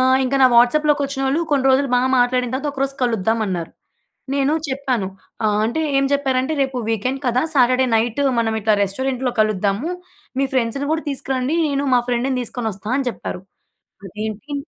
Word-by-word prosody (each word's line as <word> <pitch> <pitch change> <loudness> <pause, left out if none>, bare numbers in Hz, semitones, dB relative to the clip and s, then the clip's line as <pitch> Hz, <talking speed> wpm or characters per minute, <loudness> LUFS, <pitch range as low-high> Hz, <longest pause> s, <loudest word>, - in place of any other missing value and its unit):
ఆహ్, 260 +1 +4
ఇంక 265 +2 -1
నా - - +9
వాట్సాప్‍లోకొచ్చినోళ్ళు, 280 +2 +2
కొన్ని 275 -2 +2
రోజులు 275 +1 +3
బా 245 - +4 0.2
మాట్లాడిన 250 0 +2
తర్వాత, 290 +3 -2
ఒకరోజు 275 0 -2
కలుద్దామన్నారు. 220 -6 -1 0.6
నేను 280 +2 +2
చెప్పాను 260 -7 -1 0.4
ఆహ్, 210 0 +1
అంటే 280 +8 -2 0.2
ఏం 275 - +2
చెప్పారంటే, 270 0 +1
"రేపు 265 -2 -2
వీకెండ్ 255 +5 -1
కదా! 245 +1 +2
సాటర్డే 255 0 +4
నైట్ 235 +4 0 0.2
మనం 225 -1 0
ఇట్లా 215 0 +3
రెస్టారెంట్‍లో 255 +5 -2
కలుద్దాము. 215 - 0 0.5
మీ 275 - +2
ఫ్రెండ్స్‌ని 260 +3 0
కూడా 320 0 -2
తీసుకురండి, 265 +2 -2
నేను 280 0 -1
మా 245 - +5
ఫ్రెండ్‌ని 250 +2 0
తీసుకొనొస్తా" 220 -3 -5
అని 260 -3 0
చెప్పారు. 180 - -7 0.7
అదేంటి 215 - -6
255 Hz, 150 wpm, -20 LUFS, 225-275 Hz, 0.7 s, నా